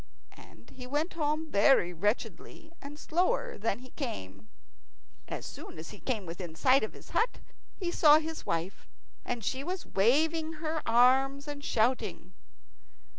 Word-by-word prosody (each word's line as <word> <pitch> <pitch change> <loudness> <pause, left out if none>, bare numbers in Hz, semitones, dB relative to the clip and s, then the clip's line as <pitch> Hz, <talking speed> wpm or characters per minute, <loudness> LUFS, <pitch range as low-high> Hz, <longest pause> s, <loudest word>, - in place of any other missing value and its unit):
And - - -17
he 250 -1 -9
went 295 +6 -1
home 310 0 -1
very 200 -4 +4
wretchedly, 210 - -3
and 285 +2 -9
slower 370 +11 0
than 205 -1 0
he 255 +1 -14
came. 105 - -6 0.8
As - - -5
soon - - -9
as 160 +1 -8
he 205 - -11
came 225 -7 -2
within 170 -1 -7
sight 255 +8 +4
of 215 - -3
his - - -14
hut 465 - +1 0.4
he 355 -3 -2
saw 300 -3 +7
his 320 0 -4
wife, 170 +3 -3 0.4
and 240 -2 -4
she 265 +6 -2
was 360 +3 -4
waving 315 +10 +2
her 315 0 -3
arms 265 +4 +4
and 290 -1 -6
shouting. 245 0 0
270 Hz, 150 wpm, -30 LUFS, 210-315 Hz, 0.8 s, saw